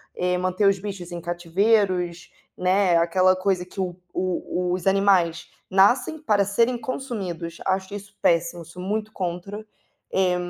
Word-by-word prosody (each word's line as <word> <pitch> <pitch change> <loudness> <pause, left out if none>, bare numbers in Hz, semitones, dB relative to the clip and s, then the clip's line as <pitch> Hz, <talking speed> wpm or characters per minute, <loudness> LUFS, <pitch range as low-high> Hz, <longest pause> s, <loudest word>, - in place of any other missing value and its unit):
eh, 180 0 0
manter 185 +2 +1
os 195 -1 +3
bichos 190 -3 -6
em 175 - -5
cativeiros, 180 +1 +1 0.3
né, 185 0 +3
é - - +6
aquela 185 +2 +3
coisa 185 -1 0
que 190 +2 -11
o 180 -2 -2 0.2
o 180 -1 -1
os 185 +1 -3
animais 190 -4 +3 0.2
nascem 240 +11 +3
para 210 -9 +2
serem 230 +5 +2
consumidos, 195 - -4
acho 190 +1 -1
isso 205 0 -8
péssimo, 170 0 +1
sou 175 +3 -10
muito 215 +3 -2
contra, 185 +3 -4 0.5
é 185 -2 +2
185 Hz, 150 wpm, -24 LUFS, 175-200 Hz, 0.5 s, é